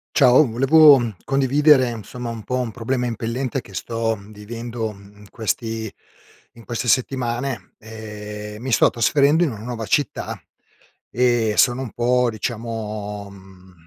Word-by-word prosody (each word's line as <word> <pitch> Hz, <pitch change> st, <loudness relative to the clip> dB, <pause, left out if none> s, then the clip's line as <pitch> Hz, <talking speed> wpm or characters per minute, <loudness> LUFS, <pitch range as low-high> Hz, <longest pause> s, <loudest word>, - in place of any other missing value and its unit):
Ciao, 130 Hz, +5 st, +6 dB
volevo, 140 Hz, +5 st, +6 dB
mhmm, 115 Hz, -5 st, -4 dB
condividere, 135 Hz, 0 st, +4 dB
insomma, 120 Hz, +2 st, -7 dB
un 115 Hz, -2 st, -6 dB
po' 125 Hz, +4 st, -2 dB
un 125 Hz, -3 st, -2 dB
problema 125 Hz, +2 st, -2 dB
impellente 120 Hz, +2 st, -3 dB
che 100 Hz, -, -16 dB
sto 115 Hz, +2 st, -2 dB
vivendo, 110 Hz, +3 st, -6 dB
mhmm, 100 Hz, 0 st, -16 dB
in 105 Hz, -1 st, -16 dB
questi 110 Hz, +1 st, -3 dB, 0.6 s
in 115 Hz, -2 st, -16 dB
queste 120 Hz, +4 st, -4 dB
settimane: 125 Hz, 0 st, -1 dB
ehm, 105 Hz, -1 st, -8 dB
mi 130 Hz, +1 st, -4 dB
sto -, -, +5 dB
trasferendo 145 Hz, +6 st, +3 dB
in 160 Hz, -, 0 dB
una 110 Hz, -2 st, -8 dB
nuova 115 Hz, -2 st, -5 dB
città 145 Hz, +8 st, -1 dB, 0.7 s
e 120 Hz, -2 st, +2 dB
sono 125 Hz, +1 st, +4 dB
un 125 Hz, -, -6 dB
po', 125 Hz, +1 st, +2 dB
diciamo, 110 Hz, -3 st, -5 dB
mhmm, 95 Hz, -1 st, -16 dB
115 Hz, 145 wpm, -21 LUFS, 105-125 Hz, 0.7 s, Ciao